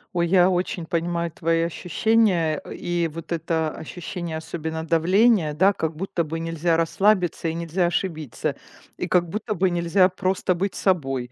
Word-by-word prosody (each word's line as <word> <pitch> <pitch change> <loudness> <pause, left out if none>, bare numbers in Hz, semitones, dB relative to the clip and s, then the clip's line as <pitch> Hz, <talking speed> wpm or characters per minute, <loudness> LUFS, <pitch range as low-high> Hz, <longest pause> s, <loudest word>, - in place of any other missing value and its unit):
Ой, 170 0 +2
я 180 +1 +5
очень 180 -2 -1
понимаю 170 0 -1
твои 165 +1 0
ощущения. 175 -1 +1
Э, - - -7
и 175 -1 -1
вот 165 +2 -9
это 160 -1 0
ощущение, 170 +1 -6
особенно 160 0 -5
давления, 175 +1 +3
да, 190 +6 +4
как 160 -5 -3
будто 175 -1 -2
бы 160 +2 -4
нельзя 165 0 0
расслабиться 175 +1 +1
и 160 - -1
нельзя 170 +2 -1
ошибиться. 165 - -2 0.4
И - - -3
как 175 -2 +2
будто 215 +3 -3
бы 185 0 +2
нельзя 175 +2 +3
просто 185 0 0
быть 185 +2 -2
собой. 135 -10 0
170 Hz, 160 wpm, -23 LUFS, 160-185 Hz, 0.4 s, я